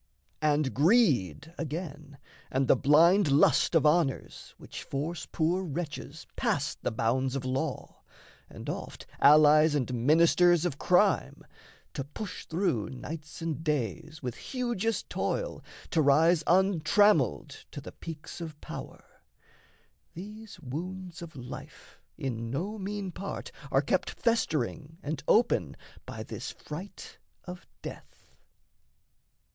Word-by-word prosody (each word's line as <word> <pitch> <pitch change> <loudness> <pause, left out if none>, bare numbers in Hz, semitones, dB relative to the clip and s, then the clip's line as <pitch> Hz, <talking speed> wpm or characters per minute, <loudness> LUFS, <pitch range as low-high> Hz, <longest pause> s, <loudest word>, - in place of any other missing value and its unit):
And 150 -3 +2
greed, 150 - +3
again, 150 -2 -5 0.3
and 135 0 0
the - - +6
blind 160 +7 +5
lust 145 +4 +4
of 160 - +4
honours 150 -3 0
Which - - -9
force 155 +4 -4
poor 175 +3 +1
wretches 155 -2 -5
past 145 +1 -1
the - - 0
bounds 125 +4 0
of 135 -1 -3
law, 130 +2 -3 0.5
And, - - -10
oft - - -6
allies 150 +1 +7
and 130 -3 -1
ministers 165 +6 +4
of 145 -6 -2
crime, 190 +2 +2 0.5
To 135 - -3
push 180 +8 -7
through 165 - 0
nights 155 +5 -8
and 160 -1 -3
days 155 +2 -2
with 125 -2 -2
hugest 235 - -2
toil - - -2 0.3
To 160 - +3
rise 155 +4 +4
untrammelled 185 - +3
to - - -7
the - - -9
peaks 165 +1 -9
of 155 -3 -7
power - - -8 1.1
These 210 +3 -9
wounds 175 +6 -6
of 165 -3 -9
life 125 -2 -10 0.2
in 115 -3 -3
no 190 - -3
mean 200 -1 -4
part 195 +3 -6 0.2
are - - +3
kept - - 0
Festering 160 - -1
and 150 0 -4
open 235 +2 +3 0.3
by - - -6
this - - -6
fright 180 +6 -9 0.3
of 180 0 -9 0.2
death. - - -10
160 Hz, 120 wpm, -29 LUFS, 140-180 Hz, 1.1 s, allies